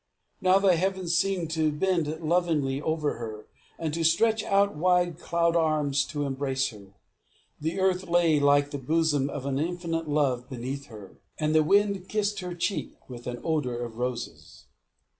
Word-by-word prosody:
Now 185 Hz, 0 st, +5 dB
the 195 Hz, -2 st, +4 dB
heavens 185 Hz, -1 st, 0 dB
seemed 175 Hz, -2 st, 0 dB
to 160 Hz, -1 st, +1 dB
bend 170 Hz, +1 st, 0 dB
lovingly 155 Hz, -5 st, +1 dB
over 155 Hz, -4 st, -1 dB
her, 110 Hz, -2 st, -7 dB, 0.3 s
and 160 Hz, -2 st, -3 dB
to 165 Hz, +1 st, -1 dB
stretch 220 Hz, +7 st, +3 dB
out 200 Hz, -1 st, +2 dB
wide 175 Hz, 0 st, +2 dB
cloud 170 Hz, -1 st, +1 dB
arms 155 Hz, -4 st, +2 dB
to 145 Hz, -2 st, -3 dB
embrace 135 Hz, -1 st, -1 dB
her; 100 Hz, -3 st, -14 dB, 0.6 s
the 160 Hz, +5 st, -2 dB
earth 190 Hz, 0 st, +1 dB
lay 170 Hz, -3 st, +3 dB
like 145 Hz, 0 st, +3 dB
the 145 Hz, -, -4 dB
bosom 150 Hz, 0 st, +1 dB
of 140 Hz, -1 st, -6 dB
an 140 Hz, -1 st, -1 dB
infinite 165 Hz, -1 st, -2 dB
love 130 Hz, -4 st, 0 dB
beneath 130 Hz, +2 st, -5 dB
her, 105 Hz, -4 st, -12 dB, 0.2 s
and 155 Hz, 0 st, 0 dB
the 155 Hz, -, +5 dB
wind 200 Hz, +2 st, +2 dB
kissed 210 Hz, -1 st, 0 dB
her 180 Hz, -1 st, -5 dB
cheek 180 Hz, +3 st, -2 dB
with 120 Hz, -2 st, -9 dB
an 120 Hz, -1 st, -5 dB
odour 150 Hz, -7 st, -1 dB
of 120 Hz, -1 st, -6 dB
roses. 125 Hz, -1 st, -5 dB
155 Hz, 165 wpm, -27 LUFS, 140-175 Hz, 0.6 s, Now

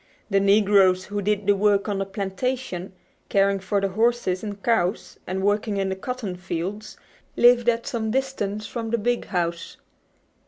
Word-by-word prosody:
The 195 Hz, -, +4 dB
negroes 195 Hz, -2 st, +4 dB
who 205 Hz, 0 st, -3 dB
did 205 Hz, 0 st, 0 dB
the 205 Hz, 0 st, +4 dB
work 200 Hz, 0 st, +2 dB
on 200 Hz, -2 st, -1 dB
the 195 Hz, -, -2 dB
plantation, 195 Hz, 0 st, -3 dB, 0.4 s
caring 200 Hz, 0 st, +2 dB
for 200 Hz, +1 st, -1 dB
the 195 Hz, 0 st, 0 dB
horses 220 Hz, -2 st, 0 dB
and 205 Hz, -2 st, -6 dB
cows, 215 Hz, -4 st, 0 dB
and 190 Hz, +1 st, -2 dB
working 205 Hz, +1 st, +1 dB
in 195 Hz, -1 st, 0 dB
the 190 Hz, -, -2 dB
cotton 220 Hz, -2 st, -5 dB
fields, 190 Hz, +4 st, -5 dB, 0.4 s
lived 240 Hz, 0 st, +5 dB
at 235 Hz, 0 st, 0 dB
some 225 Hz, -2 st, -2 dB
distance 215 Hz, -5 st, -2 dB
from 230 Hz, 0 st, -5 dB
the 235 Hz, -, +1 dB
"big" 240 Hz, +2 st, -1 dB
house. 170 Hz, -2 st, -3 dB
205 Hz, 165 wpm, -24 LUFS, 190-225 Hz, 0.4 s, lived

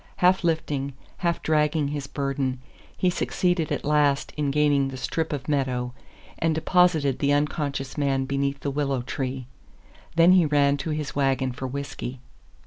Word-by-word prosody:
Half 185 Hz, +1 st, +4 dB
lifting, 150 Hz, -4 st, -1 dB, 0.2 s
half 170 Hz, -2 st, -1 dB
dragging 150 Hz, -1 st, +2 dB
his 145 Hz, -1 st, -4 dB
burden, 135 Hz, -2 st, -2 dB, 0.4 s
he 185 Hz, -, +2 dB
succeeded 175 Hz, -2 st, 0 dB
at -, -, -2 dB
last 145 Hz, -2 st, +2 dB
in 150 Hz, -2 st, 0 dB
gaining 145 Hz, -1 st, +3 dB
the 135 Hz, -1 st, -6 dB
strip 160 Hz, +5 st, -2 dB
of 140 Hz, -3 st, -4 dB
meadow, 130 Hz, -4 st, -1 dB, 0.5 s
and 165 Hz, -1 st, +1 dB
deposited 160 Hz, -4 st, +3 dB
the 140 Hz, 0 st, +2 dB
unconscious 145 Hz, -2 st, -1 dB
man 135 Hz, -2 st, +1 dB
beneath 140 Hz, 0 st, -1 dB
the 140 Hz, -, -2 dB
willow 135 Hz, -3 st, -1 dB
tree. 130 Hz, 0 st, -4 dB, 0.7 s
Then 165 Hz, +2 st, +6 dB
he 180 Hz, -4 st, +5 dB
ran 145 Hz, -1 st, +3 dB
to 150 Hz, -, -4 dB
his 150 Hz, -2 st, -3 dB
wagon 135 Hz, -2 st, +1 dB
for 130 Hz, +2 st, -5 dB
whisky. 135 Hz, -1 st, -5 dB
140 Hz, 155 wpm, -25 LUFS, 135-155 Hz, 0.7 s, Then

